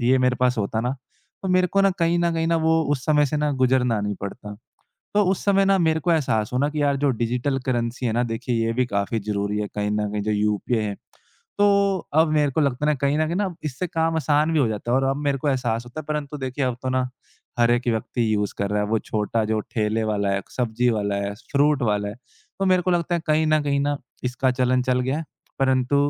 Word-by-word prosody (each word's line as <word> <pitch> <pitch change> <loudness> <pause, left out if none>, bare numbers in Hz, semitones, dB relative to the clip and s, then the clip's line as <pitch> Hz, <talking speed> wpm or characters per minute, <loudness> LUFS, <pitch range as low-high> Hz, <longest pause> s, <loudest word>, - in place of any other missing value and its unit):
ये 125 +2 +3
मेरे 125 0 +2
पास 125 -1 +2
होता 110 +2 -1
ना, 125 +2 -1 0.5
तो 190 - -2
मेरे 185 0 +3
को 195 +3 +1
ना 195 0 +4
कहीं 170 0 +2
न 170 0 +1
कहीं 165 0 0
न 165 - +2
वो 160 0 +3
उस 130 -3 -2
समय 150 -1 +4
से 145 - -2
ना 150 0 +1
गुज़रना 130 -4 +2
नहीं 105 0 -2
पड़ता। 105 +1 -7 0.6
तो 210 0 +4
उस 190 - -2
समय 195 -1 +4
ना 195 0 +3
मेरे 160 -2 +2
को 170 +3 +1
एहसास 110 -9 +1
हुआ 125 - 0
ना 145 - +2
कि 150 0 -2
यार 140 -1 +2
जो 140 0 +1
डिजिटल 125 +4 0
करेंसी 120 0 -1
है 115 - 0
ना 120 +2 +1
देखिए 115 +2 -2
ये 115 - 0
भी 125 +2 +1
काफ़ी 100 0 -1
ज़रूरी 100 0 -2
है 105 - -1
कहीं 105 0 -1
न 105 0 0
कहीं 105 -1 -2
जो 110 - -2
यूपीआई 105 +2 0
है। 100 -1 -3 0.6
तो 200 -1 +3 0.2
अब 160 - +4
मेरे 150 -2 +2
को 160 - +1
लगता 140 0 0
है - - +2
कहीं 140 +1 +1
न 155 - +2
कहीं 170 - -2
न - - 0
अब 185 -4 -4
इससे 150 +4 -3
काम 165 -1 0
आसान 155 0 +2
भी 160 - +2
हो 135 - +3
जाता 110 +2 -4
है 125 - +3
और 135 - +2
अब 135 - -1
मेरे 140 -1 +1
को 145 - -2
एहसास 120 -4 0
होता 120 +5 -7
है - - -11
परंतु 150 -1 -3
देखिए 130 +1 -2
अब 125 -2 -1
तो 130 - -2
ना 130 0 0 0.5
हर 120 0 +4
1 120 +1 +1
व्यक्ति 115 0 0
यूज़ 105 -1 -1
कर 100 0 -1
रहा 105 0 +1
है - - -1
वो 110 +1 +2
छोटा 110 +1 -1
जो 110 0 0
ठेले 110 0 0
वाला 105 -2 0
है, 100 0 -1
सब्ज़ी 120 0 0
वाला 100 -2 -1
है, 100 0 -3 0.2
फ्रूट 145 0 +3
वाला 105 -3 0
है, 100 - -6
तो 130 +9 -9
मेरे 185 -1 +3
को 185 - 0
लगता 175 0 +1
है 170 - 0
कहीं 155 0 +2
न 155 0 +3
कहीं 140 -1 0
न 145 0 0 0.3
इसका 125 +1 +1
चलन 125 0 +3
चल 125 0 +1
गया 130 +3 -1
है। 165 - -5 0.3
परंतु 130 0 +2
130 Hz, 260 wpm, -23 LUFS, 110-155 Hz, 0.6 s, ना